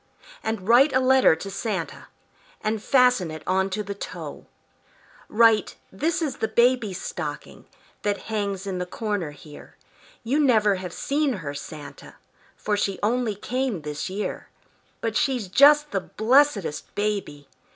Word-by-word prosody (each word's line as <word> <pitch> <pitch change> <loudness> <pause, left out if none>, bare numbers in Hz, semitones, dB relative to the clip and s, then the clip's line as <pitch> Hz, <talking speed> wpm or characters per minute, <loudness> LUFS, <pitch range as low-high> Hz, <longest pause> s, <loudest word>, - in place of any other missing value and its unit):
And 220 -4 -4
write 260 +5 +6
a 260 - +4
letter 260 -8 +5
to 195 +5 -7
Santa, 195 -6 -4 0.5
And 215 0 -1
fasten 250 -8 +3
it 155 0 -8
on 190 +1 +1
to 210 +2 -3
the 200 0 -5
toe. 200 - -8 0.8
Write, 225 -1 +4 0.2
"This 315 - -1
is 290 -4 -3
the 220 - -1
baby's 235 -6 +2
stocking - - -6 0.3
That 205 -1 -2
hangs 200 -3 -3
in 190 -2 -3
the 180 - -3
corner 205 -5 -3
here; 145 +1 -14 0.5
You 260 +6 0
never 215 -8 +3
have 180 -1 -6
seen 285 - 0
her, 160 -9 -5
Santa, 145 0 -10 0.4
For 210 - -1
she 200 -1 -1
only 230 0 +1
came 245 - -3
this 150 +3 -4
year; 200 +3 -5 0.5
But 225 -1 -2
she's 250 -6 0
just 295 +8 +5
the 195 - -1
blessedest 225 - +1
baby! 200 -9 -3
210 Hz, 145 wpm, -24 LUFS, 185-250 Hz, 0.8 s, write